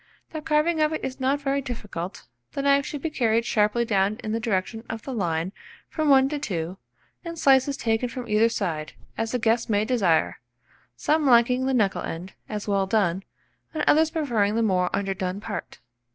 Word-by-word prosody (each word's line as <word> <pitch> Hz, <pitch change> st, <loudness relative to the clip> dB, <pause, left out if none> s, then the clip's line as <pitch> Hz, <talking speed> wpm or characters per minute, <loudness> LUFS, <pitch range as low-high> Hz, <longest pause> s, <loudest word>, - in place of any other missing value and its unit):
The 315 Hz, -, -5 dB
carving 315 Hz, +2 st, +1 dB
of 305 Hz, 0 st, +3 dB
it 315 Hz, -, -3 dB
is 265 Hz, 0 st, -5 dB
not 270 Hz, +2 st, +1 dB
very 275 Hz, 0 st, 0 dB
difficult: 205 Hz, -8 st, -6 dB, 0.3 s
the 275 Hz, -, -3 dB
knife 280 Hz, 0 st, +3 dB
should 290 Hz, -3 st, -6 dB
be 325 Hz, -, -2 dB
carried 230 Hz, -4 st, +1 dB
sharply 215 Hz, +2 st, +2 dB
down 200 Hz, -1 st, +1 dB
in 215 Hz, -, -3 dB
the 225 Hz, -, 0 dB
direction 225 Hz, 0 st, -2 dB
of 225 Hz, -1 st, -5 dB
the 270 Hz, -, -5 dB
line 175 Hz, -4 st, -1 dB, 0.4 s
from 310 Hz, -2 st, 0 dB
1 265 Hz, -1 st, +6 dB
to 295 Hz, 0 st, -3 dB
2, 180 Hz, -, -3 dB, 0.5 s
and 335 Hz, -1 st, -6 dB
slices 275 Hz, -1 st, +4 dB
taken 225 Hz, +2 st, 0 dB
from 245 Hz, 0 st, -6 dB
either 215 Hz, +2 st, +3 dB
side, 165 Hz, -9 st, -3 dB, 0.2 s
as 225 Hz, 0 st, -2 dB
the 250 Hz, -, +1 dB
guests 230 Hz, 0 st, +1 dB
may 210 Hz, 0 st, +2 dB
desire, 200 Hz, -10 st, +1 dB, 0.6 s
some 300 Hz, -, +1 dB
liking 250 Hz, +1 st, +4 dB
the 265 Hz, -, +1 dB
knuckle 205 Hz, -5 st, +1 dB
end, 175 Hz, +3 st, -6 dB, 0.2 s
as 210 Hz, -1 st, -4 dB
well 195 Hz, -1 st, +1 dB
done, 195 Hz, -3 st, +1 dB, 0.5 s
and 310 Hz, -, -1 dB
others 315 Hz, +1 st, +4 dB
preferring 235 Hz, -11 st, 0 dB
the 230 Hz, -, +2 dB
more 180 Hz, -4 st, +2 dB
underdone 195 Hz, -1 st, -2 dB
part. -, -, -6 dB
230 Hz, 190 wpm, -25 LUFS, 200-275 Hz, 0.6 s, 1